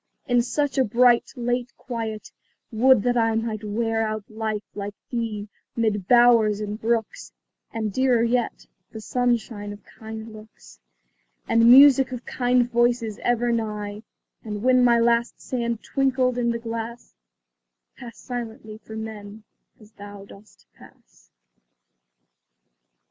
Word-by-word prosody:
In 245 -1 +3
such 285 +3 -1
a - - +5
bright, 240 +1 +3
late 245 0 -2
quiet, 225 -3 -6 0.4
would 240 0 +4
that 245 0 +1
I 225 -1 +2
Might 225 -1 -3
wear 225 +1 -1
out 215 -1 -2
life 215 -1 -3
like 205 0 -6 0.2
thee, 225 -4 -3 0.3
'mid 210 -5 -1
bowers 235 -4 +5
and 210 +1 -5
brooks 225 -1 -2 0.4
And 220 -3 -3
dearer 255 -2 +2
yet, 240 0 -1 0.2
the 220 - -9
sunshine 225 -3 -2
of 205 0 -11
kind 220 0 -10
looks, 210 - -15 0.7
And 230 0 +4
music 270 0 +7
of 250 -1 -7
kind 245 -1 +1
voices 240 -2 0
ever 240 0 +1
nigh; 210 -2 -3 0.4
And 210 -1 -6
when 255 0 +4
my 240 -1 +5
last 235 0 +1
sand 235 -3 -3
twinkled 260 -2 0
in 240 -1 0
the 235 - -1
glass, 230 0 -7 0.8
Pass 235 -2 -11
silently 225 -3 -7
from 220 0 -8
men, 210 -1 -9 0.4
as 215 -1 -18
thou 205 -1 -11
dost 200 +1 -18
pass. - - -20
230 Hz, 130 wpm, -24 LUFS, 215-245 Hz, 0.8 s, music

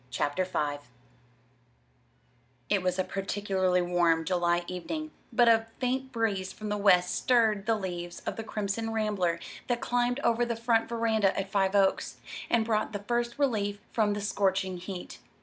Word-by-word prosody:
CHAPTER 145 +8 0
V 145 -5 -2 1.9
It 205 -2 +2
was 180 0 0
a 185 - +2
particularly 190 -2 0
warm 170 -2 +2
July 175 -1 +1
evening, 305 - -5 0.2
but 240 0 +4
a 225 -1 +4
faint 260 +1 -1
breeze 205 -6 -1
from 215 +1 -7
the 210 - 0
west 180 -3 +4
stirred 220 -5 +2
the 225 - +3
leaves 175 -3 -5
of - - -2
the 225 - -5
Crimson 215 +1 -3
Rambler 205 -6 0 0.3
that 245 -1 0
climbed 245 +2 0
over 235 -1 +2
the 235 -1 -1
front 230 0 +1
veranda 225 -4 +1
at 195 0 -4
Five 195 0 +2
Oaks, 195 -1 +2 0.3
and 230 -2 +3
brought 220 -1 0
the 205 0 -4
first 240 +2 -1
relief 210 -8 0
from 210 -2 +2
the 205 - -3
scorching 190 -2 0
heat. 180 0 -7
205 Hz, 160 wpm, -29 LUFS, 185-230 Hz, 1.9 s, but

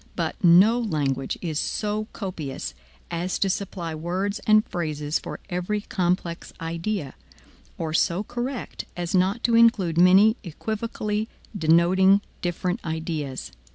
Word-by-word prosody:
But - - -3
no 190 +7 +7
language 140 - -1
is 160 -3 -1
so 215 0 -2
copious 170 -9 -5 0.4
as 175 +2 -1
to 195 - +1
supply 180 -4 -4
words 185 +6 -2
and 215 0 +6
phrases 150 -3 -2
for - - -7
every 180 +4 -2
complex 180 -3 -2
idea, 165 -1 -3 0.6
or 160 -1 -3
so 175 +4 +2
correct 245 +3 -5
as 175 -1 -3
not 190 +4 +2
to 235 - +3
include 200 -8 +4
many 195 +6 +6
equivocally 215 +3 -3 0.3
denoting 185 +3 +4 0.2
different 180 +4 -2
ideas. 160 -5 -4
180 Hz, 120 wpm, -25 LUFS, 165-210 Hz, 0.6 s, no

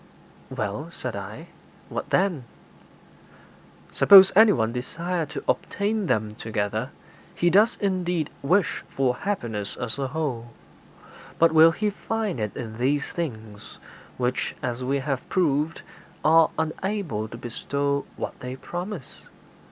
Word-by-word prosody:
'Well,' - - -4
said - - -5
I, - - -8 0.4
'what - - -5
then?' 180 -9 +1 1.5
'Suppose 195 -1 +8
anyone 195 - +5
desire 165 +7 -3
to - - -6
obtain 205 0 0
them 110 -5 0
together, 110 +2 -3 0.5
he 175 0 +2
does 210 +5 +4
indeed 180 -5 -1
wish 180 +7 +1
for 130 -2 0
happiness 115 - -3
as 115 +4 -4
a 135 - -1
whole; 125 -5 -4 0.8
but 165 - +5
will 160 +1 +8
he 210 +4 -1
find 215 - -3
it 105 -1 -3
in 110 -2 -6
these 140 +3 +1
things 110 -11 -6 0.4
which, 125 0 -1
as 125 -1 -3
we 135 +2 0
have 135 -1 -3
proved, 155 -3 0 0.4
are 160 +1 +6
unable 160 - -2
to 115 - -9
bestow 140 +4 -2
what - - -5
they 125 +1 -6
promise?' 175 +2 -7
145 Hz, 125 wpm, -25 LUFS, 120-180 Hz, 1.5 s, Suppose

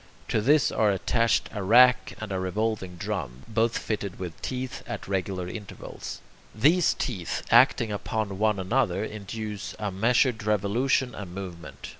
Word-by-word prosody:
To 110 - +1
this 145 +4 +4
are 110 - +2
attached 115 +4 +1
a 105 - -3
rack 125 +6 +5
and 110 -2 -6
a 95 - -1
revolving 95 0 -2
drum, 85 - -4
both 115 +1 +1
fitted 100 -3 -3
with 90 -3 -7
teeth 130 0 -4
at - - -6
regular 95 -1 -2
intervals. 100 +2 -8 0.3
These 155 +10 +4
teeth, 95 -10 -3
acting 120 -1 +5
upon 105 -1 -3
one 105 -1 +2
another, 95 0 0
induce 105 0 -6
a 105 -2 -3
measured 115 +4 +2
revolution 110 +5 +1
and 95 -4 -8
movement. 85 -8 -8
105 Hz, 145 wpm, -26 LUFS, 95-115 Hz, 0.3 s, rack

